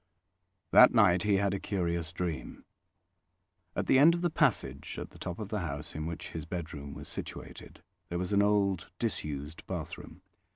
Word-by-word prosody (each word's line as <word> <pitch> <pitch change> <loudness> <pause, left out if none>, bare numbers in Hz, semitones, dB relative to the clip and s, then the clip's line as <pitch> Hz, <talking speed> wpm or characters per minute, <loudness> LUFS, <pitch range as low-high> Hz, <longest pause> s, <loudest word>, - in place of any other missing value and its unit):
That 125 -1 +8
night 90 -6 +5
he 105 0 +3
had 100 0 +2
a 100 - -1
curious 85 -5 -2
dream. 85 -2 -4 1.1
At - - -1
the 130 - +5
end 165 +4 +7
of 170 - -3
the 175 - +2
passage 100 - 0
at - - -6
the - - -15
top 90 0 -5
of 105 -3 -6
the 105 -1 -1
house, 75 -4 -5
in 80 +1 -4
which 85 - -6
his 80 - -5
bedroom 75 -5 -6
was - - -8
situated, - - -8 0.3
there 85 - -2
was 90 +3 -2
an 100 - +5
old 100 -5 +2
disused 75 -9 -3
bathroom. 90 +3 -6
90 Hz, 175 wpm, -31 LUFS, 80-105 Hz, 1.1 s, That